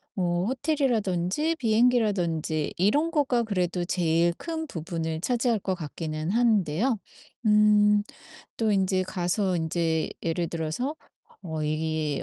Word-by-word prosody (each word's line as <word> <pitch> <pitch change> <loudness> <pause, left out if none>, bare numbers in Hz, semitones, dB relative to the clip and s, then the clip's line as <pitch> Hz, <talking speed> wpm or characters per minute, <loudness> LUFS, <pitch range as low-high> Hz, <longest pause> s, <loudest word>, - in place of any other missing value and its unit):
어 175 -1 0
호텔이라든지 260 - 0
비행기라든지 210 - +1
이런 285 - +2
거가 275 -7 +1
그래도 180 -5 -1
제일 170 -1 +2
큰 320 -1 -4
부분을 165 - -4
차지할 240 +1 +1
것 190 - -1
같기는 155 -1 -4
한데요 220 - +2 0.5
음 210 -1 +5 0.5
또 220 -2 +1
인제 190 -1 +2
가서 185 +1 -1
인제 160 0 0
예를 170 +1 -1
들어서 165 - -3 0.5
어 160 -3 -4
이 155 -1 -1
185 Hz, 250 characters per minute, -26 LUFS, 165-230 Hz, 0.5 s, 음